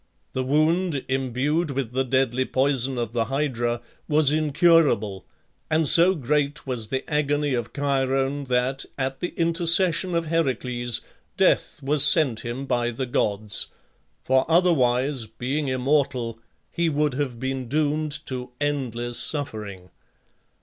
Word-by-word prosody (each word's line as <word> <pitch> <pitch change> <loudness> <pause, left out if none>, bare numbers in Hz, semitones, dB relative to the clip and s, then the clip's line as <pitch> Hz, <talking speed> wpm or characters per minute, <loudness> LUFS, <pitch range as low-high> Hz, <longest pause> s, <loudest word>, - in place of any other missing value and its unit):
The 130 - -1
wound, 155 +2 +1
imbued 135 +5 -1
with 135 -4 -3
the 130 +1 0
deadly 130 -1 +1
poison 130 -1 +1
of 120 -2 -3
the 115 -1 0
Hydra, 120 -4 -2 0.3
was 150 -2 +3
incurable, 150 - +2 0.4
and 155 -1 +2
so 175 +5 +6
great 145 0 -1
was 125 -5 -4
the 130 +3 -4
agony 145 -1 0
of 120 -2 -3
Chiron 135 0 -1
that, 130 +1 -1
at 135 0 -3
the 175 - -2
intercession 170 +1 +2
of 170 0 0
Heracles, 125 -7 -1 0.4
death 150 - +1
was 145 +1 +5
sent 145 -7 +5
him 120 +3 -5
by 120 -2 0
the 120 +3 -4
gods; 105 -3 -1 0.6
for 130 0 +2
otherwise, 135 -7 +2
being 135 +6 -3
immortal, 130 -3 0 0.3
he 170 -1 0
would 150 -2 0
have 130 -3 -3
been 130 -1 -3
doomed 150 +2 -1
to 125 -1 -5
endless 120 -5 -1
suffering. 105 - -3
135 Hz, 130 wpm, -24 LUFS, 125-150 Hz, 0.6 s, so